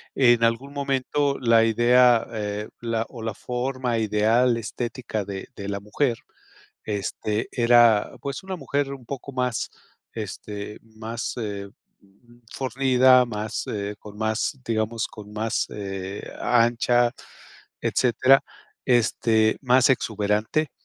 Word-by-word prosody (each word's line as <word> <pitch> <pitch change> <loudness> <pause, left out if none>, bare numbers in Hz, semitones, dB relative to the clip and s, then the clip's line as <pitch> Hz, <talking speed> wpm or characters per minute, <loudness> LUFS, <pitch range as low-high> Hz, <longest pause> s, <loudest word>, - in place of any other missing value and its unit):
en 120 -3 +4
algún 120 +5 -1
momento 140 0 0
la 115 -2 +4
idea, 120 +1 +4
eh, 105 -1 -4
la 115 -1 -1
o 120 -4 -10
la 115 - -2
forma 125 0 -2
ideal 110 +3 +3
estética 115 -1 -4
de 95 -1 -7
de 100 -1 -6
la 100 0 -2
mujer, 115 +3 0 0.7
este, 105 +1 -2
era, 120 -3 +5
pues, 140 +4 -4
una 190 -1 -4
mujer 140 -1 -2
un 130 -3 -12
poco 140 0 -6
más, 125 -3 -1 0.5
este, 105 -1 -6
más, 110 0 -6
eh, 100 -3 -4 0.8
fornida, 130 0 +4
más, 110 -2 -4
eh, 100 -1 -3
con 105 0 -12
más, 110 +5 -1
digamos, 110 0 -1
con 105 -1 -12
más, 110 +1 -1
eh, 95 -1 -5 0.2
ancha, 120 0 +3 0.7
etcétera. 130 +2 +3 0.4
Este, 115 -2 +2
más 130 0 +4
exuberante, 110 +5 0
115 Hz, 120 wpm, -24 LUFS, 105-125 Hz, 0.8 s, era